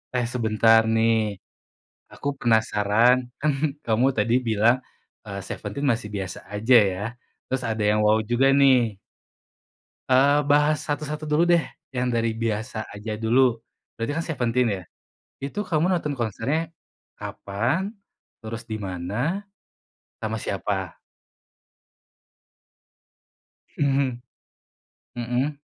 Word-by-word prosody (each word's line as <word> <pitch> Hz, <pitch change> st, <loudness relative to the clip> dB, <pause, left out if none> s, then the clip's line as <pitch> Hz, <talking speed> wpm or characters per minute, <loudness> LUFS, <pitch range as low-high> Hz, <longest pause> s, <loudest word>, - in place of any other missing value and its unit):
Eh, 120 Hz, -1 st, +1 dB
sebentar 115 Hz, -1 st, +4 dB
nih, 110 Hz, -2 st, +2 dB, 0.7 s
aku 140 Hz, -, -6 dB
penasaran. 110 Hz, +1 st, +3 dB, 0.2 s
Kan 150 Hz, 0 st, +3 dB, 0.3 s
kamu 115 Hz, +3 st, +3 dB
tadi 110 Hz, +3 st, +2 dB
bilang, 110 Hz, +3 st, +4 dB, 0.5 s
eee, -, -, -6 dB
Seventeen 140 Hz, +1 st, -5 dB
masih 110 Hz, -2 st, -3 dB
biasa 95 Hz, -1 st, -4 dB
aja 110 Hz, +5 st, +3 dB, 0.2 s
ya, 95 Hz, +2 st, -5 dB, 0.4 s
terus 130 Hz, 0 st, -2 dB
ada 110 Hz, -1 st, -1 dB
yang 105 Hz, 0 st, +2 dB
wow 105 Hz, +1 st, +5 dB
juga 120 Hz, +4 st, +3 dB
nih. 125 Hz, -7 st, +4 dB, 1.1 s
Eee, 140 Hz, +3 st, +5 dB
bahas 150 Hz, +1 st, +3 dB
satu-satu 150 Hz, +1 st, -3 dB
dulu 155 Hz, +3 st, +3 dB
deh, 175 Hz, -1 st, +4 dB, 0.3 s
yang 125 Hz, 0 st, 0 dB
dari 115 Hz, -1 st, 0 dB
biasa 110 Hz, 0 st, -2 dB
aja 105 Hz, +2 st, -6 dB
dulu. 115 Hz, +2 st, +2 dB, 0.3 s
Berarti 115 Hz, +5 st, -3 dB
kan 165 Hz, -, -1 dB
Seventeen 125 Hz, -5 st, +1 dB
ya, -, -, -13 dB, 0.6 s
itu 140 Hz, +9 st, -5 dB
kamu 165 Hz, +1 st, +1 dB
nonton 170 Hz, -5 st, 0 dB
konsernya 130 Hz, +7 st, -2 dB, 0.5 s
kapan, 130 Hz, -, -2 dB, 0.5 s
terus 115 Hz, +1 st, -5 dB
dimana, 110 Hz, -, -3 dB, 0.7 s
sama 110 Hz, 0 st, -2 dB
siapa? 95 Hz, -2 st, -3 dB, 2.8 s
Mhm. 135 Hz, -3 st, +1 dB, 0.9 s
Heeh. 125 Hz, +5 st, -1 dB
120 Hz, 105 wpm, -24 LUFS, 110-140 Hz, 2.8 s, wow